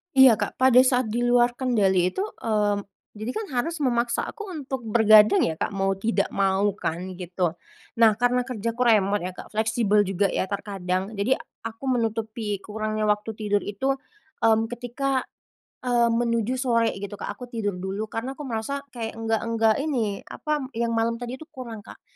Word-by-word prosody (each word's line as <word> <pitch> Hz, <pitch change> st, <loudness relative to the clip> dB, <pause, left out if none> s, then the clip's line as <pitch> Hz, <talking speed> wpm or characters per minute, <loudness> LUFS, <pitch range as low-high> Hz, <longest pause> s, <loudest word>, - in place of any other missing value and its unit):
Iya, 265 Hz, -3 st, +8 dB
Kak, -, -, -4 dB
pada 260 Hz, -1 st, +5 dB
saat 255 Hz, -2 st, +2 dB
di 235 Hz, +3 st, -1 dB
luar 245 Hz, 0 st, +3 dB
kendali 195 Hz, -8 st, +2 dB
itu, -, -, -6 dB, 0.2 s
eee, 210 Hz, -2 st, +1 dB, 0.3 s
jadi 215 Hz, +3 st, -4 dB
kan 440 Hz, +10 st, -4 dB
harus 325 Hz, +7 st, -1 dB
memaksa 240 Hz, -4 st, 0 dB
aku 425 Hz, -, -7 dB
untuk 270 Hz, -6 st, -5 dB
bergadang 215 Hz, -2 st, +6 dB
ya 160 Hz, -, +1 dB
Kak, -, -, -2 dB
mau 195 Hz, -1 st, 0 dB
tidak 200 Hz, +1 st, 0 dB
mau 195 Hz, +1 st, +2 dB
kan 180 Hz, 0 st, -4 dB
gitu. 175 Hz, -1 st, -2 dB, 0.4 s
Nah, 225 Hz, -1 st, +6 dB
karena 245 Hz, +1 st, +2 dB
kerjaku 230 Hz, 0 st, -2 dB
remote 205 Hz, -2 st, +2 dB
ya 180 Hz, -, -3 dB
Kak, 185 Hz, -, -12 dB
fleksibel 220 Hz, -1 st, +2 dB
juga 195 Hz, 0 st, +1 dB
ya 190 Hz, 0 st, -2 dB
terkadang, 195 Hz, 0 st, -3 dB
jadi 210 Hz, +6 st, +1 dB, 0.2 s
aku 225 Hz, +2 st, -7 dB
menutupi 220 Hz, -2 st, -2 dB
kurangnya 215 Hz, +1 st, -2 dB
waktu 210 Hz, +1 st, 0 dB
tidur 205 Hz, -1 st, 0 dB
itu, 265 Hz, +7 st, -1 dB, 0.5 s
mmm, 225 Hz, 0 st, +4 dB
ketika, 250 Hz, +3 st, -2 dB, 0.6 s
eee, 240 Hz, -1 st, +3 dB
menuju 235 Hz, +1 st, 0 dB
sore 235 Hz, -3 st, +2 dB
gitu 200 Hz, +1 st, -6 dB
Kak, -, -, -5 dB
aku 250 Hz, -, -7 dB
tidur 215 Hz, -6 st, -3 dB
dulu, 195 Hz, +4 st, -4 dB
karena 250 Hz, +4 st, -4 dB
aku 295 Hz, -, -8 dB
merasa 265 Hz, +2 st, -3 dB
kayak 230 Hz, -3 st, -5 dB
enggak 225 Hz, -1 st, -1 dB
enggak 225 Hz, -1 st, +3 dB
ini 245 Hz, -9 st, -2 dB
apa 300 Hz, -3 st, -3 dB
yang 235 Hz, +1 st, 0 dB
malam 230 Hz, 0 st, +1 dB
tadi 245 Hz, +2 st, -5 dB
itu 315 Hz, -, -11 dB
kurang 230 Hz, -4 st, -8 dB
Kak. -, -, -13 dB
225 Hz, 175 wpm, -25 LUFS, 205-245 Hz, 0.6 s, Iya